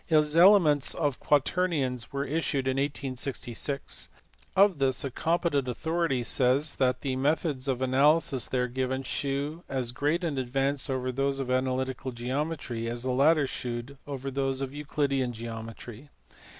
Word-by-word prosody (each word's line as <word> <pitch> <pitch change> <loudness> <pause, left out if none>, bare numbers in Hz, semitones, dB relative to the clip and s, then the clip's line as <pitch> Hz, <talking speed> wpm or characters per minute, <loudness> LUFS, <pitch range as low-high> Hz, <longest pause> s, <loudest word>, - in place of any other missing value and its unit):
His 150 -2 +3
Mlematf* 170 -6 +5
o/Quatemum* 145 -1 +1
were 140 0 -2
issued 145 -2 -1
in 130 0 0
1866: 135 -1 -2 0.5
of 195 -5 +4
this 130 -1 +2
a 140 - -3
compe 170 +5 0
tent 140 -3 0
authority 160 0 -1
says 130 +5 +2
that 125 -1 +1
the 135 -2 -2
methods 140 0 0
of 130 -1 0
analysis 135 0 +3
there 125 -1 0
given 130 +1 -2
shew 140 +5 -3
as 130 -3 -1
great 150 +7 0
an 150 -5 -1
advance 135 +3 -1
over 130 -1 -1
those 135 +2 0
of 130 -2 -3
analytical 130 0 -1
geometry, 125 -1 -3
as 120 +1 -3
the 130 - -2
lillm 140 +6 +5
ihneiMl 125 +1 -5
over 135 -1 -5
those 135 0 -1
of 135 0 -4
Euclidean 140 -3 -1
geometry. 115 +3 -8
135 Hz, 145 wpm, -28 LUFS, 130-150 Hz, 0.5 s, Mlematf